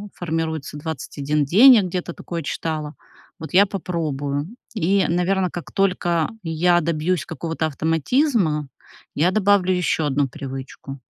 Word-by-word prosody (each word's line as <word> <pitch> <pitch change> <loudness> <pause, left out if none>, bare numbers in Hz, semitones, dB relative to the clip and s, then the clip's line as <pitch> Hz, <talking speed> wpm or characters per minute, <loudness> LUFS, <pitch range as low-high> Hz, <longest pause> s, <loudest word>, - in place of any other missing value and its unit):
формируется 160 -3 -3
21 150 -1 -2
день, 235 - +8
я 220 - +5
где-то 180 -1 -4
такое 170 0 -6
читала, 155 0 -4 0.4
вот 160 - -8
я 195 +3 +7
попробую. 150 -6 -3 0.3
И, 195 0 +2
наверно, 180 +2 +1
как 175 - -7
только 175 -4 +1
я 175 +1 +2
добьюсь 165 +1 -1
какого-то 160 -1 -3
автоматизма, 160 - +1 0.5
я 170 +5 +3
добавлю 200 -2 +3
ещё 175 -3 0
1 145 -1 +1
привычку. 135 0 -8
165 Hz, 125 wpm, -22 LUFS, 150-185 Hz, 0.5 s, день